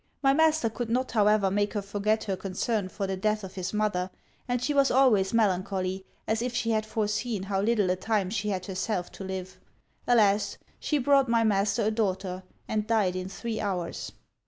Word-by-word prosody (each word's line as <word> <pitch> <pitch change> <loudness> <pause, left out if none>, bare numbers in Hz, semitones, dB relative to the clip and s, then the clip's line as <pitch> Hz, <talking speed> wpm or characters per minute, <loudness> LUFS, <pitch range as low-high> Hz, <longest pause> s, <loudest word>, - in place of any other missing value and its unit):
My 270 0 +5
master 315 -3 +3
could 230 +1 -4
not 255 +3 0
however 210 -3 +3
make 205 +1 0
her 205 - -1
forget 205 +2 0
her 195 -2 -2
concern 195 +2 -2
for 200 +1 -3
the 190 0 -2
death 215 +2 0
of 190 - -8
his 185 -2 -4
mother; 210 -4 0 0.4
and 245 0 0
she 270 +5 -1
was 275 -1 +4
always 235 -8 +4
melancholy, 190 -3 0 0.2
as 220 +1 0
if 245 0 -2
she 230 -1 0
had 215 -1 0
foreseen 215 -1 -1
how 195 0 -1
little 205 -3 +2
a - - +1
time 195 -1 -1
she 210 -1 -1
had 185 -2 -2
herself 190 -1 -2
to - - -9
live. 185 -1 -6 0.5
Alas! 210 -4 +3 0.2
she 300 - 0
brought 275 -1 +3
my 230 -1 +3
master 205 +1 +2
a 215 - +2
daughter, 190 -4 -1 0.3
and 215 -1 -1
died 210 -5 +2
in 185 0 -4
three 225 +2 -4
hours!' 180 -4 -3
210 Hz, 195 wpm, -28 LUFS, 190-230 Hz, 0.5 s, My